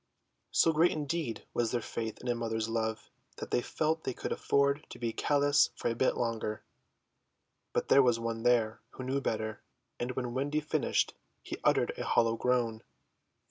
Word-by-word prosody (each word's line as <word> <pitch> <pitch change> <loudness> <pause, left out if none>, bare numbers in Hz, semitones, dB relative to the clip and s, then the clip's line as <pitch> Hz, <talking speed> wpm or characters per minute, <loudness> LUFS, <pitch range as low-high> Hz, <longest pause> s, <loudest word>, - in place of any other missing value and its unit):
So 165 - +4
great 165 +3 +5
indeed 150 -4 -3
was 120 -1 +1
their 120 - 0
faith 110 -1 -5
in - - -7
a 120 - +2
mother's 115 -1 -2
love 110 -1 -2 0.2
that - - -7
they - - +2
felt 160 +5 -1
they 130 - -3
could - - -4
afford 140 +1 +2
to - - -9
be 115 -1 -2
callous 145 +2 +3
for - - -1
a 115 - -1
bit 130 - +2
longer. 110 -2 -2 1.1
But - - -1
there 140 - +8
was 120 -3 +3
one 115 -1 -3
there 115 -2 +2
who 130 - -7
knew 135 +2 -1
better, 110 -3 -2 0.4
and 125 +1 -2
when 125 -1 -3
Wendy 145 +4 0
finished 155 - 0 0.3
he - - -6
uttered - - +3
a - - -1
hollow 115 -1 +3
groan. 120 -2 0
120 Hz, 180 wpm, -31 LUFS, 115-140 Hz, 1.1 s, there